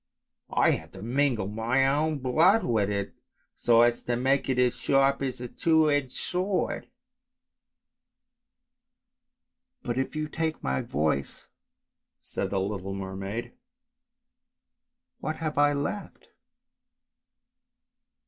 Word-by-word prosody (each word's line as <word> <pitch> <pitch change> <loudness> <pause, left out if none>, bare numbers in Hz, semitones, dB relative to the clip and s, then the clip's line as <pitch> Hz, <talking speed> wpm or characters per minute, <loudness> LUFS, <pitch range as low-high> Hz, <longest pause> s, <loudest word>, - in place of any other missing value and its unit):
I - - +5
have - - -4
to 95 0 -9
mingle 125 -3 +1
my 115 +6 +1
own 150 +3 +1
blood 160 - +4
with 110 -4 +1
it 100 -1 -2 0.4
so 115 -1 +4
as 120 0 +2
to 120 - -1
make 135 +3 +1
it 130 - +1
as 125 -1 +3
sharp 135 +1 +2
as 130 -2 -3
a 125 - -5
two 160 +3 +3
edged 145 -3 0
sword." 185 +2 -2 1.1
" - - -57
But 120 +1 -2
if 135 - -2
you 155 0 -2
take 160 0 -3
my 65 0 0
voice." 75 -2 -2 0.7
said - - -4
the 100 - 0
little 95 0 -3
mermaid, 95 +3 -5 0.8
" - - -60
what 155 +2 -2
have 155 -3 -3
I 145 0 +5
left? 145 +9 -4
130 Hz, 120 wpm, -27 LUFS, 105-145 Hz, 1.1 s, I